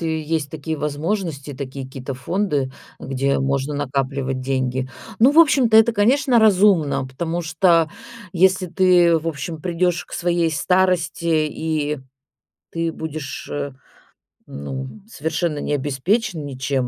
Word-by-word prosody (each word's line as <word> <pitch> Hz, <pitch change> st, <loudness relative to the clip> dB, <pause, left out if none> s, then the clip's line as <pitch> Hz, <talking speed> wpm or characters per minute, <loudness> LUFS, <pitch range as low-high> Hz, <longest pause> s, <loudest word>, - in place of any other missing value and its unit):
и 160 Hz, -1 st, -1 dB
есть 155 Hz, -2 st, -2 dB
такие 160 Hz, 0 st, -4 dB
возможности, 150 Hz, 0 st, -3 dB
такие 135 Hz, 0 st, -6 dB
какие-то 130 Hz, 0 st, -7 dB
фонды, 145 Hz, -2 st, -1 dB, 0.3 s
где 135 Hz, +1 st, -1 dB
можно 135 Hz, +2 st, -1 dB
накапливать 135 Hz, -1 st, -2 dB
деньги. 130 Hz, -1 st, -1 dB, 0.3 s
Ну, 255 Hz, +5 st, +6 dB
в 315 Hz, -, +3 dB
общем-то, 270 Hz, -8 st, +5 dB
это, 225 Hz, +1 st, +6 dB
конечно, 245 Hz, +5 st, +3 dB
разумно, 185 Hz, -10 st, +4 dB
потому 165 Hz, +6 st, -3 dB
что 165 Hz, 0 st, +3 dB, 0.4 s
если 185 Hz, +1 st, +3 dB
ты, 175 Hz, -1 st, +4 dB
в 165 Hz, +1 st, -3 dB
общем, 155 Hz, +1 st, -5 dB
придешь 175 Hz, 0 st, 0 dB
к -, -, -19 dB
своей 170 Hz, -1 st, +1 dB
старости 180 Hz, +1 st, +1 dB, 0.2 s
и 150 Hz, -2 st, -2 dB, 0.7 s
ты 165 Hz, 0 st, -1 dB
будешь, 155 Hz, -3 st, -6 dB
э, 145 Hz, -1 st, -3 dB, 0.8 s
ну, 130 Hz, -, -6 dB, 0.2 s
совершенно 160 Hz, -4 st, -2 dB
не 145 Hz, -, -2 dB
обеспечен 155 Hz, -, -1 dB
ничем, 135 Hz, -1 st, -2 dB
160 Hz, 130 wpm, -21 LUFS, 140-180 Hz, 0.8 s, Ну